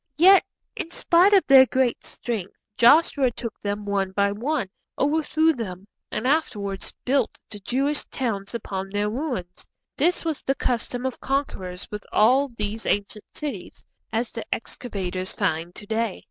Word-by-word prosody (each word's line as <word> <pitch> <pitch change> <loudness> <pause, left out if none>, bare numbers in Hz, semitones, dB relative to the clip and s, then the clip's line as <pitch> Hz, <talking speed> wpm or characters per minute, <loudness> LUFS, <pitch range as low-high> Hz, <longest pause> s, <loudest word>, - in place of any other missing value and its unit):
Yet, 380 +4 +7 0.3
in 325 - -4
spite 345 +3 +4
of 395 -2 +5
their 265 -1 +8
great 255 +1 +1
strength, 215 -6 -5 0.2
Joshua 275 +1 +5
took 230 -1 -7
them 205 0 -3
one 195 -2 -1
by 200 +1 +2
one, 235 +2 -1 0.3
overthrew 315 +2 +2
them, 195 - -6 0.3
and 215 - -3
afterwards 210 -10 0
built 260 -2 +1
the 205 - -8
Jewish 275 +8 0
towns 215 -5 -3
upon 195 -4 -4
their 205 +1 -1
ruins. 240 - -4 0.3
This 350 0 +2
was 320 -3 -2
the 270 - 0
custom 245 0 -2
of 260 - -3
conquerors 195 -10 -3
with 210 -1 -5
all 255 +6 +4
these 220 -2 -4
ancient 205 +1 -1
cities, 300 -2 -6 0.3
as 230 +1 -1
the 230 - -5
excavators 190 -6 -4
find 165 +2 -1
to 210 - -7
day. 225 -1 -1
230 Hz, 150 wpm, -24 LUFS, 200-275 Hz, 0.3 s, their